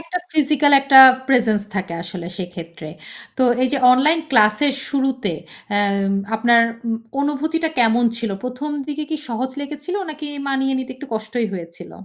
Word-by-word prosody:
একটা 330 Hz, +2 st, -5 dB
physical 295 Hz, -1 st, +2 dB
একটা 275 Hz, -1 st, +6 dB, 0.3 s
presence 225 Hz, -6 st, +2 dB
থাকে 190 Hz, -3 st, -3 dB
আসলে 175 Hz, 0 st, -7 dB
সেক্ষেত্রে। 170 Hz, -3 st, -8 dB, 0.5 s
তো -, -, +2 dB, 0.2 s
এই 255 Hz, -, +2 dB
যে, 275 Hz, -, +1 dB
অনলাইন 300 Hz, +6 st, +3 dB
ক্লাস 215 Hz, -3 st, +4 dB
এর 275 Hz, -, +1 dB
শুরুতে 265 Hz, -7 st, -1 dB, 0.4 s
আ -, -, +3 dB, 0.6 s
আপনার 235 Hz, +1 st, +4 dB, 0.3 s
উ 230 Hz, -, -1 dB, 0.3 s
অনুভূতিটা 315 Hz, +3 st, -1 dB
কেমন 235 Hz, +1 st, +3 dB
ছিল? 230 Hz, -3 st, -4 dB
১ম 250 Hz, +4 st, -5 dB, 0.2 s
দিকে 300 Hz, +1 st, -4 dB
কি 310 Hz, -, -1 dB
সহজ 250 Hz, +3 st, -3 dB
লেগেছিল 295 Hz, +6 st, -6 dB
নাকি 300 Hz, 0 st, -8 dB, 0.2 s
মানিয়ে 270 Hz, 0 st, 0 dB
নিতে 260 Hz, -, -6 dB
একটু 280 Hz, +2 st, -10 dB
কষ্টই 220 Hz, +2 st, -3 dB
হয়েছিল? 170 Hz, -2 st, -9 dB
255 Hz, 155 wpm, -19 LUFS, 215-290 Hz, 0.6 s, একটা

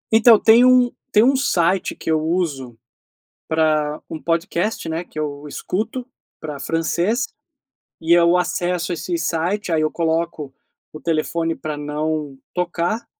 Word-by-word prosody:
Então, 225 Hz, -1 st, +7 dB
tem 230 Hz, +2 st, +6 dB
um 250 Hz, -1 st, +5 dB, 0.2 s
tem 215 Hz, -2 st, +5 dB
um 270 Hz, +3 st, +4 dB
site 185 Hz, -8 st, +1 dB
que -, -, -6 dB
eu 155 Hz, -1 st, +2 dB
uso, 155 Hz, -8 st, -2 dB, 0.7 s
para 155 Hz, -2 st, +1 dB
um 160 Hz, -, -5 dB
podcast, 170 Hz, +5 st, -1 dB
né, 160 Hz, +1 st, -2 dB
que 155 Hz, -, -11 dB
eu 145 Hz, -1 st, -4 dB
escuto 225 Hz, -, -3 dB, 0.3 s
para 150 Hz, -3 st, -6 dB
francês 170 Hz, -, 0 dB, 0.7 s
e 165 Hz, +1 st, +1 dB
eu 170 Hz, 0 st, +5 dB
acesso 180 Hz, -1 st, -1 dB
esse 340 Hz, -, -3 dB
site, 180 Hz, -, -1 dB
aí 155 Hz, -1 st, +2 dB
eu 155 Hz, -, +1 dB
coloco 165 Hz, -3 st, -2 dB, 0.4 s
o 155 Hz, -, -9 dB
telefone 165 Hz, 0 st, -1 dB
para 155 Hz, -1 st, -5 dB
não 150 Hz, -1 st, -3 dB, 0.2 s
tocar 180 Hz, +5 st, -1 dB
165 Hz, 140 wpm, -21 LUFS, 155-185 Hz, 0.7 s, Então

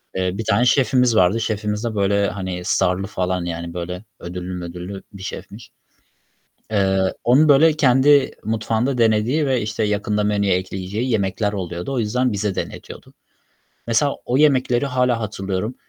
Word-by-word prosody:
Eee, 95 Hz, 0 st, -1 dB
bir 115 Hz, -, -3 dB
tane 125 Hz, -, +2 dB
şefimiz 125 Hz, -2 st, +3 dB
vardı. 95 Hz, +3 st, +3 dB
Şefimiz 105 Hz, 0 st, -2 dB
de 115 Hz, -2 st, -3 dB
böyle, 100 Hz, 0 st, +2 dB
hani, 95 Hz, -2 st, -5 dB
star'lı 90 Hz, +2 st, +1 dB
falan, 90 Hz, -2 st, -2 dB
yani, 85 Hz, 0 st, -5 dB
böyle, 90 Hz, +4 st, -6 dB
ödüllü 90 Hz, +1 st, -6 dB
mödüllü 90 Hz, +2 st, -7 dB
bir 95 Hz, -1 st, -10 dB
şefmiş. 105 Hz, +2 st, -8 dB, 1.0 s
Eee, 95 Hz, -2 st, +1 dB
onun, 140 Hz, +6 st, +5 dB
böyle, 155 Hz, +3 st, +6 dB
kendi 140 Hz, -1 st, +4 dB
mutfağında 115 Hz, +4 st, -1 dB
denediği 115 Hz, +7 st, +2 dB
ve, 130 Hz, -2 st, +1 dB
işte, 110 Hz, +1 st, -2 dB
yakında 105 Hz, 0 st, 0 dB
menüye 100 Hz, -2 st, +1 dB
ekleyeceği 95 Hz, +6 st, -4 dB
yemekler 105 Hz, -1 st, 0 dB
oluyordu. 90 Hz, +3 st, -4 dB
O 130 Hz, -, -1 dB
yüzden 125 Hz, +3 st, 0 dB
bize 100 Hz, -1 st, -1 dB
denetiyordu. -, -, -7 dB, 0.7 s
Mesela 120 Hz, +5 st, +2 dB
o 125 Hz, -, 0 dB
yemekleri 130 Hz, -3 st, +3 dB
hâlâ 125 Hz, -2 st, +1 dB
hatırlıyorum. 100 Hz, +1 st, -3 dB
105 Hz, 145 wpm, -21 LUFS, 95-125 Hz, 1.0 s, böyle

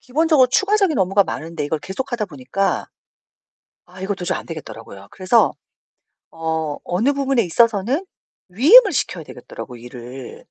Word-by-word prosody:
기본적으로 295 Hz, -1 st, +3 dB
추가적인 390 Hz, -, +2 dB
업무가 195 Hz, +2 st, +3 dB
많은데 160 Hz, -2 st, -5 dB
이걸 155 Hz, +1 st, -2 dB
계속하다 235 Hz, -, -4 dB
보니까 160 Hz, +5 st, -2 dB, 1.0 s
아 185 Hz, +1 st, -14 dB
이거 200 Hz, +1 st, -1 dB
도저히 180 Hz, -2 st, -3 dB
안 -, -, -9 dB
되겠더라고요. 115 Hz, -, -10 dB
그래서 195 Hz, +5 st, +2 dB, 0.8 s
어 160 Hz, -2 st, -3 dB
어느 225 Hz, +11 st, 0 dB
부분에 275 Hz, -3 st, +1 dB
있어서는 230 Hz, -, +1 dB, 0.4 s
위임을 355 Hz, -, +7 dB
시켜야 180 Hz, -, -2 dB
되겠더라고요, 125 Hz, -2 st, -10 dB
일을. 125 Hz, +1 st, -10 dB
190 Hz, 365 characters per minute, -20 LUFS, 155-265 Hz, 1.0 s, 위임을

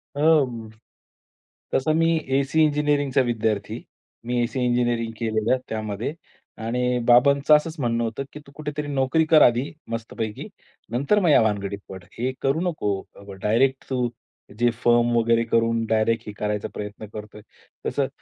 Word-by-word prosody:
अं, 140 Hz, -7 st, +2 dB, 1.0 s
तसं 145 Hz, +4 st, +2 dB
मी 165 Hz, 0 st, +3 dB, 0.2 s
एसी 140 Hz, +3 st, +1 dB
इंजिनिअरिंगचा 145 Hz, -2 st, +1 dB
विद्यार्थी. 110 Hz, -4 st, -2 dB, 0.4 s
मी 120 Hz, 0 st, 0 dB
AC 120 Hz, +3 st, -3 dB
engineering 120 Hz, -2 st, 0 dB
केलेलं 110 Hz, +2 st, +1 dB
त्यामध्ये 110 Hz, +3 st, -3 dB, 0.5 s
आणि 125 Hz, +1 st, 0 dB
बाबांचं 140 Hz, +5 st, +6 dB
असंच 155 Hz, +2 st, 0 dB
म्हणणं 120 Hz, -2 st, 0 dB
होतं 115 Hz, +4 st, -3 dB
की 150 Hz, -, -8 dB
तू -, -, -14 dB
कुठेतरी 150 Hz, 0 st, -5 dB
नोकरी 140 Hz, +3 st, +1 dB
कर 155 Hz, -2 st, +7 dB
आधी 120 Hz, +4 st, +4 dB, 0.2 s
मस्तपैकी 115 Hz, -1 st, -5 dB, 0.4 s
नंतर 140 Hz, -, +2 dB
मग 180 Hz, -4 st, +2 dB
या 145 Hz, -, +6 dB
भानगडीत 100 Hz, -2 st, -1 dB
पड. 95 Hz, -2 st, -9 dB, 0.2 s
हे 125 Hz, +2 st, 0 dB
करू 135 Hz, +4 st, +1 dB
नको 105 Hz, -, -2 dB, 0.2 s
अ, 100 Hz, 0 st, -11 dB
डायरेक्ट. 115 Hz, +7 st, +1 dB
तू 125 Hz, -2 st, 0 dB, 0.5 s
जे 120 Hz, 0 st, +4 dB
फर्म 120 Hz, 0 st, +4 dB
वगैरे 115 Hz, 0 st, +3 dB
करून 115 Hz, 0 st, +1 dB
डायरेक्ट 110 Hz, 0 st, +1 dB
हे 105 Hz, -, -6 dB
करायचा 105 Hz, -1 st, -2 dB
प्रयत्न 105 Hz, +1 st, -7 dB
करतोय. 105 Hz, 0 st, -9 dB, 0.5 s
तसं -, -, 0 dB
120 Hz, 145 wpm, -24 LUFS, 110-140 Hz, 1.0 s, कर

